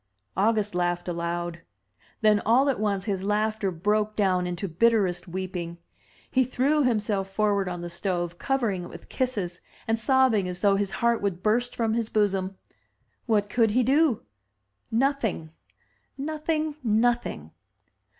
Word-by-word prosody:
• - - -51 0.3
August 210 +1 +1
laughed 175 0 -1
aloud; 170 0 -3 0.6
then 215 -1 +5
all 250 +7 +3
at 265 - 0
once 200 -2 0
his 195 -3 -2
laughter 210 0 0
broke 210 +4 0
down 185 -3 +2
into 180 +2 -3
bitterest 185 -1 +2
weeping. 175 -1 -5 0.5
He 260 - +4
threw 270 +4 +1
himself 210 -5 0
forward 200 -1 +1
on 175 -1 -5
the 175 - -5
stove, 175 -1 -2
covering 235 -9 0
it - - -9
with 170 - -12
kisses, 205 -9 -2 0.3
and 225 0 +1
sobbing 255 -5 +3
as 180 0 -5
though 200 -1 +4
his 200 0 0 0.2
heart 235 -1 +3
would 190 -3 -2
burst 240 +3 +1
from 225 -2 0
his 230 -1 -1
bosom. 195 -2 0 0.7
What 210 -3 +2
could 225 +1 +2
he 255 - +4
do? 275 0 +3 0.7
Nothing, 230 - 0 0.7
nothing, 310 +1 -2
nothing! 225 - 0
210 Hz, 145 wpm, -26 LUFS, 180-235 Hz, 0.7 s, then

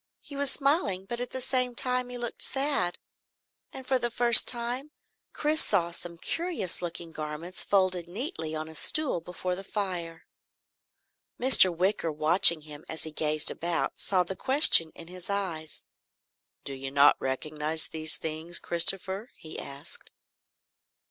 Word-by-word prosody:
He 290 - -13
was 280 0 -1
smiling 270 - 0
but 240 +4 -6
at 245 0 -3
the 260 - -4
same 255 -1 0
time 250 0 0
he 250 - -8
looked 240 -1 -3
sad. 270 -10 -1 0.7
And 265 - -10
for 260 -1 0
the 240 - -2
first 235 0 +7
time 245 +4 -4 0.4
Chris 305 +1 -2
saw 175 -4 0
some 170 0 -8
curious 325 - -4
looking 170 -1 -7
garments 155 +3 -6
folded 185 -3 0
neatly 180 - -6
on 155 0 -6
a 160 - -12
stool 270 - -1
before 180 +1 -6
the 195 - -9
fire. 180 -5 -6 1.1
Mr. 250 -7 +6
Wicker, 175 -1 -2
watching 160 +2 +4
him 150 0 -12
as 160 - -2
he 160 - -5
gazed 155 0 +1
about, 170 0 -4
saw 185 -2 0
the 190 +2 -7
question 260 - +7
in 165 - -13
his 180 +1 -10
eyes. 175 -6 -4 0.8
"Do 140 - -7
you 135 0 -7
not 140 +1 +4
recognise 150 +4 -3
these 155 -1 -2
things, 160 +2 -3
Christopher?" 190 +5 +3
he 155 - -11
asked. 140 +1 -10
180 Hz, 150 wpm, -26 LUFS, 160-245 Hz, 1.1 s, first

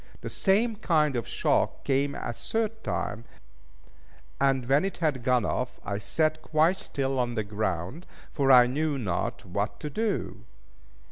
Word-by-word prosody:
The - - -6
same 215 +3 +2
kind 155 -8 +2
of 120 - -2
shock - - 0
came 140 +1 +1
a 120 - -4
third 220 - -2
time; 115 - -3 1.2
and 135 -2 +2
when 140 +5 +3
it 195 -1 -3
had 150 -6 0
gone 125 -3 +2
off, 125 0 -2
I 100 0 -2
sat 155 +7 0
quite 160 +4 +2
still 135 -5 -2
on 120 -1 -1
the 110 - 0
ground, 105 - -3 0.3
for 135 -2 +3
I 125 -1 +9
knew 145 +3 -1
not 100 -9 -2
what 100 +4 -3
to 150 - -4
do. 220 +5 -2
135 Hz, 155 wpm, -27 LUFS, 120-160 Hz, 1.2 s, I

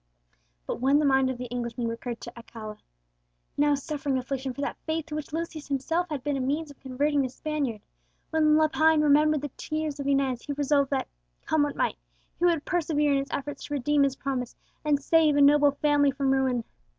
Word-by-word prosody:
But - - -4
when 275 +2 +4
the 300 - +2
mind 265 -1 +3
of 260 - -3
the 250 - -5
Englishman 240 -1 -3
recurred 230 +1 -5
to - - -8
Aguilera, 220 -2 -9 0.8
now 290 0 +3
suffering 285 -1 -2
affliction 265 +1 -3
for 280 - -7
that 285 - -3
faith 320 -1 -1
to 305 -2 -6
which 305 -2 -5
Lucius 320 -1 -4
himself 325 +6 -1
had 290 -4 -4
been 290 -1 -1
a - - -2
means 290 +4 -2
of 285 - -17
converting 280 +2 0
the 260 - -1
Spaniard; 275 -6 -3 0.5
when 310 -1 +4
Lepine 315 0 +4
remembered 300 0 +4
the 290 -2 -5
tears 310 -2 -3
of 280 - -3
Inez, 270 -3 +1
he 290 - -4
resolved 285 -1 +1
that, 270 -2 -1 0.4
come 315 -1 +2
what 290 -1 0
might, - - 0 0.4
he 350 - +2
would 335 -4 +2
persevere 305 -4 +1
in 275 - +3
his 275 - -4
efforts 290 +1 -5
to 290 - -4
redeem 290 +2 +2
his 275 -1 +2
promise, 260 -3 -3 0.3
and 295 -2 +2
save 310 0 +3
a 290 - +4
noble 290 +1 +6
family 285 0 +2
from 275 0 0
ruin. 260 -3 +1
285 Hz, 205 wpm, -27 LUFS, 265-300 Hz, 0.8 s, noble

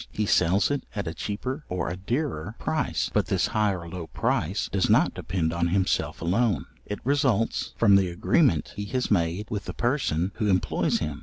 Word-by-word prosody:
He 105 - -1
sells 95 +4 +3
it 145 - -1
at 100 - -2
a 80 - -3
cheaper 125 - -4
or 90 -1 -2
a 85 - -3
dearer 110 - -3
price; - - -1
but - - +2
this - - +1
high 105 -1 +3
or 85 -2 -7
low 85 -1 -6
price 95 +6 -1
does 95 -2 +1
not - - +4
depend 85 -2 -2
on 85 0 +1
himself 95 -2 0
alone; 100 - +1 0.2
it 105 - -3
results 130 -5 +1
from 100 -3 +6
the 95 -2 +3
agreement 85 - +2
he 105 - -4
has 125 +3 -2
made 90 +1 +1
with 105 -1 -3
the - - -6
person 120 - 0
who 105 -3 0
employs 90 -2 +1
him. 75 -2 -4
100 Hz, 190 wpm, -26 LUFS, 85-115 Hz, 0.2 s, from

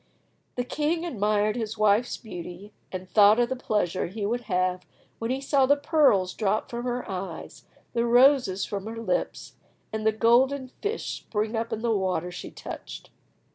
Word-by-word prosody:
The 245 - -1
king 310 +6 -1
admired 210 - +1
his 225 -2 -4
wife's 215 +3 +2
beauty, 180 -1 -9 0.2
and 185 0 -6
thought 210 +3 +6
of 240 0 +2
the 260 - -1
pleasure 210 -8 -1
he 205 +3 -4
would 240 +3 -2
have 180 0 0 0.4
when 230 - -3
he 260 +1 0
saw 275 -1 +2
the 285 - +5
pearls 285 - +3
drop 215 0 -1
from 240 +1 -4
her 245 0 -2
eyes, 185 -4 -6 0.3
the 235 0 +1
roses 245 -5 +4
from 200 0 -5
her 225 +1 -6
lips, 230 - -3 0.4
and 220 0 -2
the 220 - +4
golden 255 +5 +3
fish 430 +2 -2
spring 215 +1 -3
up 225 +1 -2
in 220 - -3
the 230 -2 +2
water 185 -3 -1
she 175 - -7
touched. 60 -1 -9
220 Hz, 175 wpm, -26 LUFS, 195-245 Hz, 0.4 s, thought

